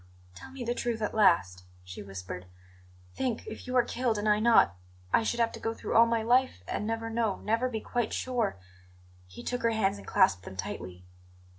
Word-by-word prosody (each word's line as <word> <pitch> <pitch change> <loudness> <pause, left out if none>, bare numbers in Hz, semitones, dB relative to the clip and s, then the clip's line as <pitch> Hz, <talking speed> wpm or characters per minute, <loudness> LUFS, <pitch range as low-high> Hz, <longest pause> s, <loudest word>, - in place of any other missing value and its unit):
"Tell 90 - -11
me 265 -1 -7
the 240 0 -1
truth 240 -2 -2
at 210 - -1
last," 170 - +3 0.2
she 90 0 -9
whispered. 90 -2 -7 0.7
"Think, 250 -4 -2
if 220 - -8
you 255 - -3
are 250 - +5
killed 240 -2 -1
and 205 +1 -2
I 210 0 +4
not 220 - +5 0.4
I - - +5
should 235 +2 -1
have 230 -1 +2
to - - -8
go 225 0 -2
through - - -4
all 230 +1 +7
my 230 -1 0
life 245 - +2
and 210 - -2
never 225 0 -2
know 225 -3 0
never 230 +4 +1
be 220 -3 -4
quite 240 -3 -2
sure 240 - -1 0.4
" - - -27 0.3
He 90 - -11
took 245 0 -2
her 230 - +3
hands 205 -3 0
and - - -13
clasped 190 - +3
them 95 - -9
tightly. 90 -1 -6
220 Hz, 210 wpm, -29 LUFS, 170-235 Hz, 0.7 s, all